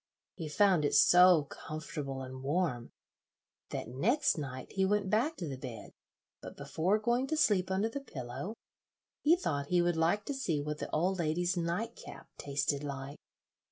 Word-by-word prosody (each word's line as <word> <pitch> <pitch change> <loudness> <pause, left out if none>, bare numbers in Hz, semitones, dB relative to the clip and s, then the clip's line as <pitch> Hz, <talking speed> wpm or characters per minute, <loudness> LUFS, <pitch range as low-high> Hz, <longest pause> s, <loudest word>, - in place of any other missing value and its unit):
He 160 -3 -6
found 185 0 +3
it 145 - +1
so 180 -3 +7
comfortable 145 -2 -6
and 130 0 -8
warm 140 -4 -1 0.8
that - - -4
next 210 - +1
night 130 -4 -6
he 195 - 0
went 200 0 +1
back 250 +10 +2
to 170 - -4
the 135 -3 -6
bed, 120 -5 -8 0.5
but - - -10
before 185 +6 0
going 240 +4 0
to 315 - -1
sleep 195 - +3
under 190 +3 +1
the 280 +5 -4
pillow 135 - -6 0.7
he 315 +3 +5
thought 145 - -2
he 180 +2 +2
would 175 -1 +1
like 170 +6 +1
to 285 - -2
see 185 - -1
what 150 +1 -4
the - - -4
old 185 +3 0
lady's 175 +3 0
night 175 +7 -2
cap - - -11
tasted 140 0 -1
like. 140 0 -6
170 Hz, 170 wpm, -32 LUFS, 140-205 Hz, 0.8 s, so